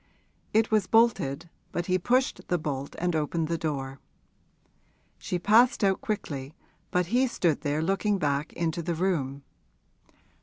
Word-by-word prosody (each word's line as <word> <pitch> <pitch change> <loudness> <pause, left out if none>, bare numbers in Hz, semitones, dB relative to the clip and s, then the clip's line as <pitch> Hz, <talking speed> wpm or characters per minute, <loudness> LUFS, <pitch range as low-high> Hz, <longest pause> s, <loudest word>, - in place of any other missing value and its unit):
It 220 +1 +2
was 210 -4 +2
bolted, 170 -10 +2 0.2
but 175 - -2
he 185 0 +1
pushed 250 +7 0
the 175 - +1
bolt 140 -3 -4
and 175 -1 0
opened 155 +1 -1
the 165 - 0
door. 135 -4 -3 1.2
She 180 - -2
passed 225 +7 +4
out 195 -1 +2
quickly, 145 -8 -4 0.3
but 180 0 +1
he 260 +2 +4
stood 170 - 0
there 150 +1 -1
looking 195 +3 +1
back 145 -2 -1
into 170 0 -2
the 170 +1 -2
room. 145 -6 -1
170 Hz, 145 wpm, -27 LUFS, 150-200 Hz, 1.2 s, passed